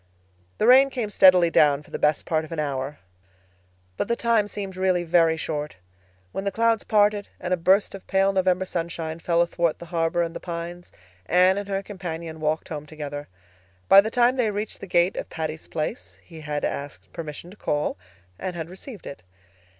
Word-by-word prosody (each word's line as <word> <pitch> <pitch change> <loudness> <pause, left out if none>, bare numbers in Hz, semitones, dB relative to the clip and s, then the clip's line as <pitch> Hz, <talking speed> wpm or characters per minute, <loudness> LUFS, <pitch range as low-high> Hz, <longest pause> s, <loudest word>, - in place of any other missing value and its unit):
The - - +1
rain 265 +3 +7
came 240 -6 -3
steadily 180 -4 +6
down 145 -2 +4
for - - -20
the - - -4
best 150 0 +2
part 160 -1 0
of 155 - -11
an 165 - -4
hour. 140 -1 -3 1.0
But - - -1
the 235 - +1
time 230 -3 +2
seemed 195 -2 -6
really 185 -1 +1
very 165 -1 +3
short. 150 -2 -4 0.6
When 195 - -4
the 200 - -1
clouds 230 +1 +2
parted 205 -1 +2
and 180 0 -2
a - - +5
burst 190 +4 +3
of 195 - -10
pale 195 0 +2
November 185 -1 +2
sunshine 165 -2 -4
fell 170 0 +2
athwart 170 -1 0
the 170 - -10
harbor 170 0 0
and 165 0 -5
the - - -4
pines 175 0 -6 0.4
Anne 185 +2 +4
and 205 - -6
her 195 0 -1
companion 170 -5 -6
walked 155 +1 -1
home 150 -1 -6
together. 145 -1 -6 0.6
By 195 - +9
the 215 - -3
time 245 +2 +3
they 250 - +2
had 210 -2 -1
reached 210 +1 -4
the 195 - -8
gate 175 +1 +2
of - - -5
Patty's 160 -1 -5
Place 160 +9 -5
he 165 -3 -12
had 150 -1 -2
asked 95 -11 -6
permission 165 +2 -7
to - - -13
call, 150 -6 -1 0.4
and 185 -1 -4
had 165 0 -6
received 200 +3 -10
it. 140 - -8
175 Hz, 195 wpm, -24 LUFS, 160-195 Hz, 1.0 s, By